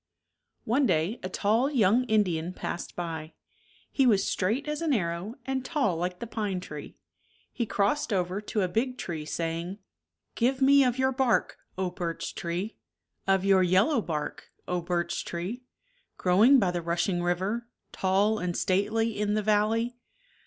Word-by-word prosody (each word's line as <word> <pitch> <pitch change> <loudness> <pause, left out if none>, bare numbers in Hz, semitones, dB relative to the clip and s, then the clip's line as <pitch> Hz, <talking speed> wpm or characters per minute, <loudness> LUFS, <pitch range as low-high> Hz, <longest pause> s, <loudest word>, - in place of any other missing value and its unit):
One 260 +4 +2
day 170 +7 +1
a 185 - -4
tall 220 +8 +2
young 240 -2 +3
Indian 185 -7 +1
passed 175 - -5
by. 160 -2 -5 0.6
He 270 -2 +3
was 205 -5 +4
straight 225 +11 0
as 300 +1 -2
an 320 -3 +1
arrow 175 +1 -2
and 265 -1 -2
tall 265 - 0
like 180 +2 -2
the 235 - -6
pine 210 -4 -2
tree. 150 -5 -9 0.6
He 235 - -2
crossed 205 +8 0
over 185 0 0
to 210 -1 -1
a - - +1
big 250 +7 -1
tree, 160 -8 -5
saying. 165 +4 -3 0.6
Give 255 +3 +1
me 275 +1 +6
of 250 -1 +1
your 260 0 +2
bark, 260 -2 +1 0.2
O 185 -1 -1
birch 175 -2 -4
tree 175 +6 -4 0.5
1 195 - +4
Of 190 0 -2
your 195 -1 +5
yellow 190 - +3
bark, 150 -5 -4 0.2
O 180 -1 -1
birch 175 0 -1
tree 180 +9 -4
I - - -43
Growing 210 +10 +5
by 195 -7 +2
the 175 -1 -2
rushing 175 +2 0
river, 190 +7 -1 0.2
Tall 200 +3 +2
and 180 -1 -2
stately 215 +4 +1
in 210 0 +1
the 215 - 0
valley 220 +3 +1
200 Hz, 165 wpm, -28 LUFS, 175-235 Hz, 0.6 s, me